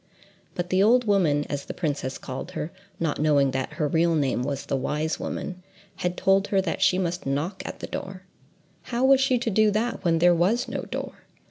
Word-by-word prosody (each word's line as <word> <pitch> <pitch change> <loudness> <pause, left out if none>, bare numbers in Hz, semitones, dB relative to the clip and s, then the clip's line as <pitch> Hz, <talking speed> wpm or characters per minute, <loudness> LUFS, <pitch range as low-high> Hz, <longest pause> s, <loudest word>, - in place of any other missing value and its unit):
But 175 0 -3
the 185 +1 +3
old 240 +5 +5
woman—as 145 -8 +1
the - - -7
princess 145 -5 -2
called 130 0 -7
her, 155 - -4 0.3
not 160 -3 -1
knowing 145 -3 +3
that 130 0 -3
her 150 - 0
real 165 +2 +2
name 135 -5 +1
was 140 +1 -3
the - - -1
Wise 150 +4 -1
Woman—had 185 -1 -6
told 195 +1 +3
her 195 - +2
that 190 -3 -2
she 180 - +4
must 175 -4 -2
knock 145 +8 -2
at - - -7
the - - -3
door: 190 -1 -6 0.6
how 245 +2 0
was 270 0 +6
she 265 -2 +3
to 235 -1 -1
do 215 +2 +4
that 215 +3 -1
when 165 -2 +3
there 175 +2 +5
was 195 +9 +1
no - - -3
door? - - -6
175 Hz, 200 wpm, -25 LUFS, 145-200 Hz, 0.6 s, was